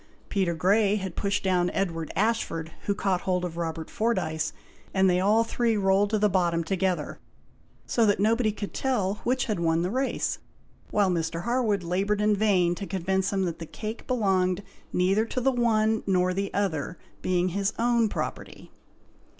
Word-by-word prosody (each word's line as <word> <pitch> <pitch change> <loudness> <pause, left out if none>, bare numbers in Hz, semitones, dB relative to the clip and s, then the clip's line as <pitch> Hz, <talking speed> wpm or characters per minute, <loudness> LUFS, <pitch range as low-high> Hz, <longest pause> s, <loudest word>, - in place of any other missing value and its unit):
Peter 185 -4 0
Grey 200 +5 +3
had 190 -4 -4
pushed 200 0 -1
down 180 -2 +2
Edward 165 -5 -2
Ashford, 200 -7 0 0.2
who 200 - +1
caught 190 -2 0
hold 180 -1 0
of 170 -2 -5
Robert 165 -1 -4
Fordyce, 175 -8 -1 0.4
and 190 0 +4
they 180 -1 +3
all 210 +4 +4
three 230 -1 0
rolled 195 +1 +3
to 215 - +1
the 210 0 +3
bottom 175 -3 +1
together, 185 +1 -1 0.7
so 235 - +1
that 205 - +2
nobody 220 +2 +2
could 205 -1 -6
tell 210 -7 0
which 255 +1 +1
had 210 -6 -2
won 165 0 +1
the 180 - -1
race; 260 +3 -1 0.5
while 200 -3 +2
Mr. 165 0 -2
Harwood 235 -5 +1
laboured 195 +4 0
in 210 0 +3
vain 190 -4 +3
to 195 +2 -6
convince 190 0 0
them 195 -1 0
that 170 -3 -3
the 165 - -7
cake 220 +5 -7
belonged 190 -6 +1 0.3
neither 190 +4 +2
to 230 +3 -3
the 270 +2 +2
one 220 -3 +2
nor 185 -1 +2
the 195 +1 -2
other, 175 -5 -2 0.2
being 180 0 +1
his 200 +2 0
own 235 -1 +2
property. - - -6
195 Hz, 175 wpm, -27 LUFS, 180-215 Hz, 0.7 s, and